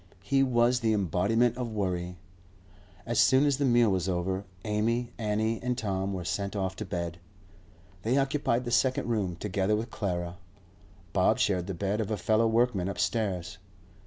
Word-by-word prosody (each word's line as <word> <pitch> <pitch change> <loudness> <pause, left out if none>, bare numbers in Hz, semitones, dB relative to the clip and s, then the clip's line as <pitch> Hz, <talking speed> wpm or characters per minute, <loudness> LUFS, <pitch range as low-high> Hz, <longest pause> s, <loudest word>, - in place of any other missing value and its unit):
He 135 -1 +2
was 125 -1 +3
the 115 -2 +1
embodiment 105 +6 +1
of 125 -2 -3
worry. 90 -3 -2 0.9
As 120 0 0
soon 135 +2 +5
as 140 -3 +2
the 140 - +1
meal 120 -4 +4
was 95 -1 0
over, 95 +2 -1 0.2
Amy, 115 +3 0
Annie, 110 +1 0
and 125 0 -1
Tom 95 -4 -2
were 90 -3 -4
sent 100 +3 -2
off 95 -2 -2
to 110 - -4
bed. 85 -3 -4 0.8
They 120 +7 +1
occupied 135 -3 +1
the 120 - -3
second 125 +2 +2
room, 105 -7 -1
together 100 +2 0
with 115 +2 -4
Clara; 90 -3 -3 0.8
Bob 95 -2 +3
shared 95 -4 +1
the 95 - -4
bed 100 +4 -1
of 105 - -3
a 110 - -1
fellow 110 +4 +2
workman 110 -5 +1
upstairs. 95 -3 -2
105 Hz, 165 wpm, -29 LUFS, 95-120 Hz, 0.9 s, soon